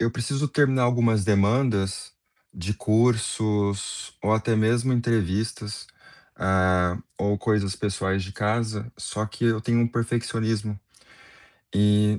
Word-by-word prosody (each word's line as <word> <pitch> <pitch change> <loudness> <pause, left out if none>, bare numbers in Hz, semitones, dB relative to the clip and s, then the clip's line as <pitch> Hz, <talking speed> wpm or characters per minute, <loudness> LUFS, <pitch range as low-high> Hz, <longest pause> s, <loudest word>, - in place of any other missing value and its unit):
eu 115 - +2
preciso 135 +5 -2
terminar 130 -2 +2
algumas 115 -4 +2
demandas 100 -2 +1 0.4
de 95 +4 -4
cursos, 105 -3 0
ou 105 +3 +2
até 110 +1 +1
mesmo 115 +4 +2
entrevistas, 110 -2 -1 0.5
eh, 95 -1 +2 0.2
ou 100 +1 0
coisas 105 -4 0
pessoais 95 -2 -1
de 95 - -9
casa, 110 +2 -2
só 105 - -4
que 110 +2 -5
eu 115 -2 +2
tenho 115 +1 +1
um 115 - +3
perfeccionismo. 115 -2 -2 1.0
E 105 +1 +3
110 Hz, 120 wpm, -25 LUFS, 100-115 Hz, 1.0 s, um